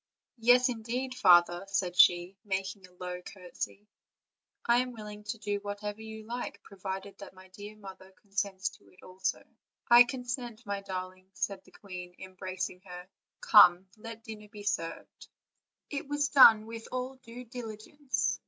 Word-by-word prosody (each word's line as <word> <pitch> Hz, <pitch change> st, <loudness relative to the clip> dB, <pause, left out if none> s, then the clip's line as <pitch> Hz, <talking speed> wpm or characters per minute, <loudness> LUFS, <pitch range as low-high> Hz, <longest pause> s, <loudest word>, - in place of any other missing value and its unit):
"Yes, 245 Hz, +2 st, +6 dB
indeed, 245 Hz, +2 st, -3 dB
father," 175 Hz, -7 st, +5 dB
said 190 Hz, -2 st, -1 dB
she, 175 Hz, +1 st, +5 dB
making 195 Hz, -1 st, -4 dB
a -, -, -24 dB
low 180 Hz, 0 st, -6 dB
cour 180 Hz, -1 st, -12 dB
tesy; 205 Hz, -, -5 dB, 0.8 s
"I 235 Hz, 0 st, +4 dB
am 250 Hz, 0 st, 0 dB
willing 210 Hz, -2 st, -9 dB
to 220 Hz, +2 st, -4 dB
do 205 Hz, -2 st, -2 dB
whatever 205 Hz, +1 st, -5 dB
you 220 Hz, 0 st, -9 dB
like, 230 Hz, -3 st, -6 dB
provided 195 Hz, 0 st, -7 dB
that 200 Hz, -1 st, -11 dB
my 185 Hz, 0 st, -15 dB
dear 205 Hz, +3 st, -10 dB
mother 190 Hz, -2 st, -12 dB
consents 195 Hz, -2 st, -2 dB
to -, -, -20 dB
it 185 Hz, -, -21 dB
also." 185 Hz, +1 st, -3 dB, 0.5 s
"I 240 Hz, +1 st, +10 dB
consent, 245 Hz, -2 st, -5 dB
my 200 Hz, -1 st, -3 dB
darling," 185 Hz, -1 st, -7 dB
said 195 Hz, -1 st, -3 dB
the -, -, -19 dB
queen, 180 Hz, -3 st, -9 dB
embracing 185 Hz, -1 st, -6 dB
her. 180 Hz, -1 st, -10 dB, 0.3 s
"Come, 185 Hz, -3 st, +7 dB
let 225 Hz, +1 st, -10 dB
dinner 210 Hz, -2 st, -10 dB
be 210 Hz, -1 st, -10 dB
served." 165 Hz, -5 st, -4 dB, 0.6 s
It 285 Hz, +1 st, -4 dB
was 290 Hz, 0 st, 0 dB
done 225 Hz, -6 st, +8 dB
with 225 Hz, 0 st, -8 dB
all 255 Hz, +1 st, -4 dB
due 245 Hz, 0 st, -11 dB
diligence. 245 Hz, +4 st, -3 dB
205 Hz, 155 wpm, -30 LUFS, 185-230 Hz, 0.8 s, I